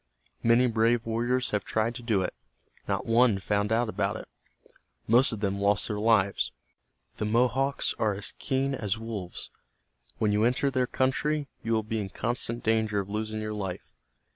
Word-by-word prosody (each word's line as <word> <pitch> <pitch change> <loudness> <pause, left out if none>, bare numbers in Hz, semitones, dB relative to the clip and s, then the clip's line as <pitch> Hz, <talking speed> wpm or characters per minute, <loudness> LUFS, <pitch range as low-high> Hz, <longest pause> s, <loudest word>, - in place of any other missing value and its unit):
Many 115 +2 +4
brave 115 0 +2
warriors 120 +3 0
have 105 -2 0
tried 110 +1 0
to 120 - -8
do 110 -5 +1
it. - - -3 0.5
Not - - -1
one 115 -2 +4
found 105 +2 0
out 115 +2 +2
about 110 - -1
it. - - -9 0.8
Most 120 +4 +5
of 110 -3 -5
them 100 -1 -1
lost 100 0 +2
their 105 -2 -3
lives. 105 -3 +2 0.7
The 105 - -1
Mohawks 125 +5 +1
are 110 -3 +1
as 100 - -2
keen 135 0 0
as 105 -5 -1
wolves. 110 -5 -6 0.7
When 105 -1 +1
you 105 +1 +2
enter 125 +4 +2
their 130 -2 +1
country, 140 +3 0
you 115 - -1
will 110 -1 +1
be 110 +1 -2
in 100 -2 -3
constant 120 +2 -2
danger 110 -2 +1
of 100 0 -5
losing 110 0 -3
your 110 0 -3
life. 95 -4 -5
110 Hz, 175 wpm, -28 LUFS, 105-120 Hz, 0.8 s, Most